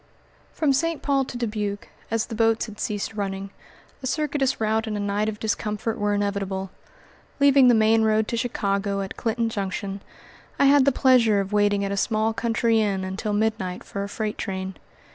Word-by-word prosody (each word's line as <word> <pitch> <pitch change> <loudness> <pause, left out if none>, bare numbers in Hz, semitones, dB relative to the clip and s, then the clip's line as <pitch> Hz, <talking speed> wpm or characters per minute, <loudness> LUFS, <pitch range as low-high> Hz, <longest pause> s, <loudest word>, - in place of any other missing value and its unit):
From 295 -4 +1
St. 330 +3 -1
Paul 275 -2 +2
to 245 - -7
Dubuque, 210 -3 -3 0.2
as 225 0 0
the 235 - -8
boats 225 0 +2
had 215 -2 -11
ceased 205 +1 -3
running, 195 -1 -4 0.5
a 260 - -3
circuitous 285 -2 0
route 220 +1 0
and 210 -1 -2
a - - -3
night 205 +1 0
of 210 -1 -6
discomfort 215 +1 -2
were 205 0 +1
inevitable. 195 -2 -2 0.7
Leaving 280 -2 +6
the 245 - +6
main 220 +1 +4
road 220 0 +2
to - - -1
Chicago 200 -4 -1
at 195 - -5
Clinton 230 0 -1
Junction, 195 -2 -4 0.6
I - - +4
had 280 -1 +6
the 280 - +5
pleasure 245 -6 +4
of 195 +1 -3
waiting 205 -1 +2
at 195 - -3
a 200 - -2
small 220 +1 +1
country 230 0 +1
inn 195 -3 0
until 190 +3 -3
midnight 205 -4 -1
for 200 - -5
a 200 - -5
freight 215 0 -3
train. 190 0 -4
215 Hz, 185 wpm, -24 LUFS, 200-230 Hz, 0.7 s, Leaving